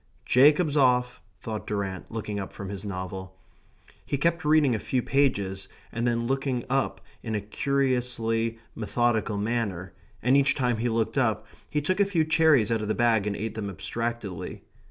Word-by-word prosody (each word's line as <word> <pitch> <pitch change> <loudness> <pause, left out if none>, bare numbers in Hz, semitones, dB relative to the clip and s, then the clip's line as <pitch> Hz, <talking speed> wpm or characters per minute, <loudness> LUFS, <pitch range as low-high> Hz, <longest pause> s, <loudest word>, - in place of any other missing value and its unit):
"Jacob's 150 +4 +5
off," 125 -3 +3 0.2
thought 110 +2 -5
Durrant 100 -3 -3
looking 105 -2 -4
up 95 - -5
from 100 -3 -7
his 100 0 -6
novel. 95 -1 -6 0.7
He 140 - -2
kept 170 +4 +1
reading 150 -3 +4
a 110 - 0
few 125 +2 -1
pages 100 -9 0 0.2
and 115 +1 -1
then 115 0 0
looking 135 -1 -1
up 135 0 0 0.2
in 110 -2 -3
a - - +1
curiously 115 -1 0 0.2
methodical 115 -1 0
manner, 105 -4 -2 0.3
and 125 +3 +4
each 140 -1 +4
time 125 -4 +1
he 120 +2 0
looked 115 0 0
up - - +1 0.2
he 150 - 0
took 185 +6 0
a 200 - +5
few 170 -5 +1
cherries 155 -8 +4
out 115 -1 +1
of 105 - -3
the 110 - 0
bag 115 -4 +2
and 100 - -1
ate 110 +1 -4
them 110 -2 -4
abstractedly. 100 0 -4
115 Hz, 175 wpm, -27 LUFS, 105-135 Hz, 0.7 s, Jacob's